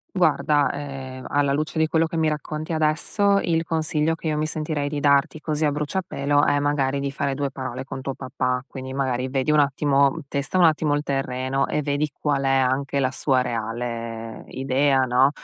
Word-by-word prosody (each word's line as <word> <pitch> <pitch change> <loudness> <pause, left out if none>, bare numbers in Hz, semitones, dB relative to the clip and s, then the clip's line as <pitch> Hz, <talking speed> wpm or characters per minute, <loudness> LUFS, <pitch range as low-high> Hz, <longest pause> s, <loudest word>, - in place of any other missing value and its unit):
Guarda, 150 -4 +3
ehm, 135 -2 -7
alla 140 -1 +2
luce 155 +3 -2
di 160 - +4
quello 160 +1 +2
che 165 - -4
mi 160 -1 +2
racconti 155 +1 -4
adesso, 160 +6 +2
il 165 -1 +1
consiglio 160 -1 0
che 165 - -6
io 155 -1 0
mi 155 +1 0
sentirei 155 -2 -2
di 145 0 -3
darti 140 +1 +3
così 155 0 -1
a 150 - +2
bruciapelo, 145 -2 0
è 145 - +3
magari 140 -1 0
di 140 0 -2
fare 140 0 -2
2 140 0 -2
parole 130 -1 -5
con 135 0 -7
tuo 135 0 -4
papà. 125 -1 -2
Quindi, 130 0 -7
magari 130 -1 -1
vedi 135 +2 0
un 150 - +4
attimo, 140 -1 +3
testa 140 +5 -2
un 180 - +5
attimo 155 -2 +3
il 145 - -1
terreno 135 -1 -1
e 150 - -1
vedi 145 +1 -1
qual 145 -2 0
è - - +2
anche 135 +1 +1
la 130 -1 +1
sua 130 -1 +1
reale 115 -1 -4
idea, 135 +1 +1
no, 130 +2 +4
140 Hz, 195 wpm, -23 LUFS, 130-150 Hz, -, un